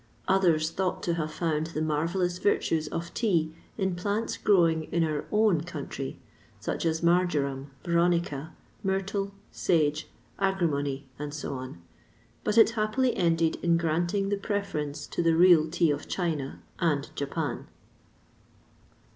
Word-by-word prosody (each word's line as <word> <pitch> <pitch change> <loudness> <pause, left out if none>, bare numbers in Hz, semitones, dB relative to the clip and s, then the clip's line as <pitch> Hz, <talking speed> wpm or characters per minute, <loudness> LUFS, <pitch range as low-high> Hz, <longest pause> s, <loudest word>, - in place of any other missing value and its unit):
Others 170 -5 +3
thought 185 -1 -2
to 170 - +1
have 155 -2 -2
found 160 -1 -1
the 160 -2 -4
marvellous 170 +4 0
virtues 165 -6 +1
of 170 +2 -5
tea 170 -9 +1 0.2
in 190 -3 0
plants 205 +5 -1
growing 165 -5 +3
in 170 +1 0
our 155 -2 -1
own 210 -6 +3
country, 145 -5 -6 0.4
such - - -2
as 160 +1 -1
marjoram, 150 -6 +1 0.2
veronica, 170 -3 +1 0.3
myrtle, 195 +1 -1 0.2
sage, 155 -3 +1 0.3
agrimony, 145 -8 0 0.2
&c. 145 0 -5 1.0
but 210 +1 0
it 225 0 +7
happily 230 +3 +1
ended 165 -2 +2
in 170 -1 +2
granting 170 +4 0
the 205 - +1
preference 175 -8 -3
to - - -2
the 165 -1 +3
real 170 -2 +6
tea 170 -1 +2
of 145 0 -3
China 155 -7 -2 0.2
and 150 -5 0
Japan. 145 +2 -3
170 Hz, 130 wpm, -28 LUFS, 155-190 Hz, 1.0 s, it